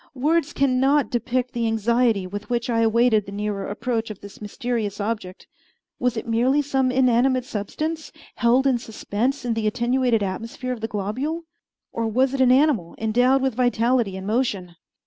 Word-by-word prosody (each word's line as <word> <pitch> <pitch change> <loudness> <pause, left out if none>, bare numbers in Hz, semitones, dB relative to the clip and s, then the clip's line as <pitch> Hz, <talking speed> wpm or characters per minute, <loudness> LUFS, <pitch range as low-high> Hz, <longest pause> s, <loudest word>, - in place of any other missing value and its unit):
Words 305 +3 +1
can 260 -2 +2
not 275 +2 +2
depict 245 +1 -1
the 235 -1 0
anxiety 225 -2 +1
with 205 +3 -7
which 240 0 -1
I 230 - +1
awaited 225 -2 +3
the - - -7
nearer 205 -1 -3
approach 225 +2 -2
of 210 -2 -8
this 200 +1 -12
mysterious 215 -1 -3
object. 205 -3 -4 0.5
Was 250 -2 0
it 225 - -4
merely 250 +6 +2
some 265 -2 +1
inanimate 255 0 +2
substance, 305 +8 -4 0.3
held 245 +3 +3
in 260 -3 +3
suspense 235 +4 -3
in 240 - 0
the 225 -1 -1
attenuated 240 0 +1
atmosphere 230 +6 -4
of 235 - -8
the 225 - -2
globule, 250 - -3 0.5
or 230 -1 -2
was 255 +4 +1
it 270 - 0
an 255 -1 +5
animal 260 - +2
endowed 245 +5 +2
with 265 -2 +1
vitality 240 -3 +1
and 190 - -7
motion? 205 -6 -1
235 Hz, 170 wpm, -23 LUFS, 215-260 Hz, 0.5 s, an